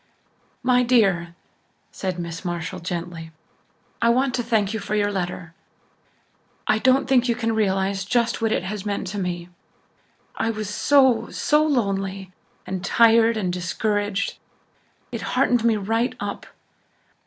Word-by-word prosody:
"My 250 Hz, 0 st, +4 dB
dear," 195 Hz, -9 st, +2 dB, 0.6 s
said 185 Hz, -2 st, -4 dB
Miss 170 Hz, -1 st, -6 dB
Marshall 175 Hz, +1 st, -4 dB
gently, 170 Hz, -1 st, -5 dB, 0.7 s
"I 230 Hz, -, +4 dB
want 255 Hz, +2 st, +2 dB
to 250 Hz, -, 0 dB
thank 220 Hz, -3 st, 0 dB
you 220 Hz, -, -2 dB
for 205 Hz, +1 st, -3 dB
your 205 Hz, -1 st, +1 dB
letter, 180 Hz, -3 st, -4 dB, 1.1 s
I 215 Hz, -, +2 dB
don't 260 Hz, +3 st, +3 dB
think 250 Hz, -2 st, +3 dB
you 235 Hz, -, +2 dB
can 225 Hz, -1 st, -1 dB
realize 195 Hz, -2 st, 0 dB
just 235 Hz, +3 st, 0 dB
what 225 Hz, -1 st, +1 dB
it -, -, 0 dB
has 195 Hz, +1 st, -4 dB
meant 205 Hz, -2 st, -2 dB
to 205 Hz, +1 st, -4 dB
me. 175 Hz, -2 st, -4 dB, 0.9 s
I 225 Hz, -, -1 dB
was 215 Hz, -2 st, -4 dB
so 265 Hz, 0 st, +3 dB
so 300 Hz, 0 st, +2 dB
lonely 195 Hz, -9 st, -1 dB, 0.3 s
and 185 Hz, 0 st, -4 dB
tired 230 Hz, +2 st, +4 dB
and 185 Hz, -4 st, -1 dB
discouraged. 205 Hz, +3 st, -1 dB, 0.7 s
It -, -, -4 dB, 0.2 s
heartened 245 Hz, -2 st, +3 dB
me 230 Hz, -2 st, +3 dB
right 225 Hz, +5 st, -1 dB
up. -, -, -5 dB
205 Hz, 145 wpm, -23 LUFS, 185-235 Hz, 1.1 s, My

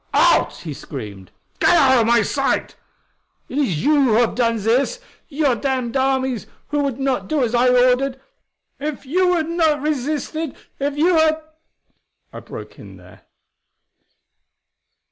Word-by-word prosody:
"Out!" -, -, +3 dB
he -, -, -6 dB
screamed. 100 Hz, -3 st, -9 dB, 0.3 s
"Get 350 Hz, -, +4 dB
out 265 Hz, -5 st, +5 dB
of 225 Hz, -, +1 dB
my 235 Hz, 0 st, +4 dB
sight! -, -, -1 dB, 0.7 s
It 275 Hz, -, -3 dB
is 190 Hz, -, 0 dB
you 290 Hz, -2 st, +4 dB
who 235 Hz, -, +2 dB
have 235 Hz, +1 st, +3 dB
done 230 Hz, -1 st, +1 dB
this 240 Hz, -, 0 dB, 0.3 s
your 285 Hz, -4 st, +1 dB
damned 255 Hz, 0 st, -2 dB
armies 265 Hz, -3 st, 0 dB, 0.2 s
who 295 Hz, -, -1 dB
would 275 Hz, -3 st, -2 dB
not 270 Hz, -2 st, -1 dB
do 305 Hz, -4 st, 0 dB
as 235 Hz, -1 st, -1 dB
I 245 Hz, +1 st, +3 dB
ordered! 255 Hz, +2 st, +2 dB, 0.6 s
If 295 Hz, 0 st, -5 dB
you 360 Hz, +5 st, +2 dB
had 320 Hz, -2 st, -1 dB
not 325 Hz, -3 st, +1 dB
resisted, 305 Hz, +1 st, -2 dB, 0.2 s
if 285 Hz, +1 st, -2 dB
you 335 Hz, +3 st, +3 dB
had 315 Hz, 0 st, +2 dB, 0.4 s
" -, -, -48 dB
I -, -, -7 dB
broke -, -, -10 dB
in -, -, -12 dB
there. -, -, -18 dB
270 Hz, 150 wpm, -20 LUFS, 245-305 Hz, 0.7 s, out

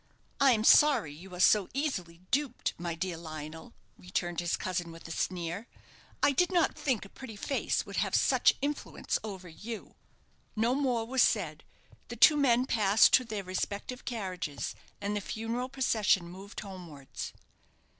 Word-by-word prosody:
"I 275 Hz, -2 st, +6 dB
am 215 Hz, -2 st, 0 dB
sorry 240 Hz, -, +6 dB
you 180 Hz, +5 st, -12 dB
are -, -, -8 dB
so 195 Hz, +1 st, +5 dB
easily 180 Hz, -, -3 dB
duped, 275 Hz, -3 st, 0 dB
my 170 Hz, -1 st, -3 dB
dear 170 Hz, 0 st, -3 dB
Lionel," 160 Hz, +5 st, -8 dB, 0.3 s
returned 175 Hz, -1 st, -2 dB
his 175 Hz, -1 st, 0 dB
cousin, 175 Hz, -2 st, -3 dB
with 165 Hz, 0 st, -11 dB
a -, -, -8 dB
sneer. 175 Hz, +5 st, -3 dB, 0.6 s
"I 285 Hz, -, +6 dB
did 355 Hz, +7 st, +2 dB
not 345 Hz, -3 st, +2 dB
think 255 Hz, -9 st, -1 dB
a -, -, -10 dB
pretty 245 Hz, -2 st, -10 dB
face 270 Hz, +7 st, -1 dB
would -, -, -7 dB
have -, -, +1 dB
such -, -, +4 dB
influence 290 Hz, 0 st, -2 dB
over 190 Hz, -4 st, -7 dB
you." 210 Hz, +7 st, -8 dB, 0.6 s
No 230 Hz, +3 st, +2 dB
more 255 Hz, -5 st, 0 dB
was 260 Hz, +2 st, +1 dB
said. -, -, +1 dB, 0.4 s
The -, -, -6 dB
two 310 Hz, -, +7 dB
men 255 Hz, -4 st, +3 dB
passed 215 Hz, -4 st, +4 dB
to 255 Hz, -, +7 dB
their 215 Hz, -4 st, -5 dB
respective 200 Hz, +6 st, -4 dB
carriages, 185 Hz, -, -4 dB, 0.3 s
and 205 Hz, +1 st, -2 dB
the 205 Hz, -, -1 dB
funeral 230 Hz, +5 st, -3 dB
procession 220 Hz, -9 st, +2 dB
moved 190 Hz, +3 st, -9 dB
homewards. 175 Hz, -9 st, -8 dB
205 Hz, 160 wpm, -30 LUFS, 175-250 Hz, 0.6 s, two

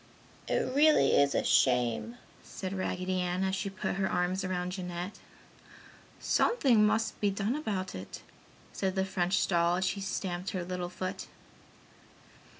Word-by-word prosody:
"It 255 Hz, -, 0 dB
really 300 Hz, +2 st, +5 dB
is 140 Hz, 0 st, +3 dB
a -, -, +2 dB
shame!" 125 Hz, -, +2 dB, 0.2 s
said 190 Hz, 0 st, -6 dB
Raggedy 185 Hz, -1 st, -2 dB
Ann 180 Hz, +1 st, -1 dB
as 190 Hz, 0 st, 0 dB
she 200 Hz, -, -3 dB
put 195 Hz, 0 st, -3 dB
her 195 Hz, -1 st, 0 dB
arms 180 Hz, +2 st, 0 dB
about 180 Hz, -1 st, -2 dB
Jeanette. 180 Hz, +1 st, -5 dB, 1.0 s
"Something 260 Hz, -, +3 dB
must 225 Hz, +1 st, -1 dB
be 205 Hz, -, +3 dB
done 200 Hz, +5 st, -1 dB
about 205 Hz, -11 st, -3 dB
it!" 95 Hz, +1 st, -8 dB, 0.5 s
said 190 Hz, -1 st, -1 dB
the 190 Hz, 0 st, +1 dB
French 185 Hz, 0 st, +1 dB
doll 170 Hz, -1 st, +2 dB
as 185 Hz, +1 st, 0 dB
she 195 Hz, +2 st, -1 dB
stamped 185 Hz, -1 st, -3 dB
her 185 Hz, -2 st, -3 dB
little 180 Hz, 0 st, -4 dB
foot. 185 Hz, +1 st, -5 dB
185 Hz, 150 wpm, -30 LUFS, 180-200 Hz, 1.0 s, really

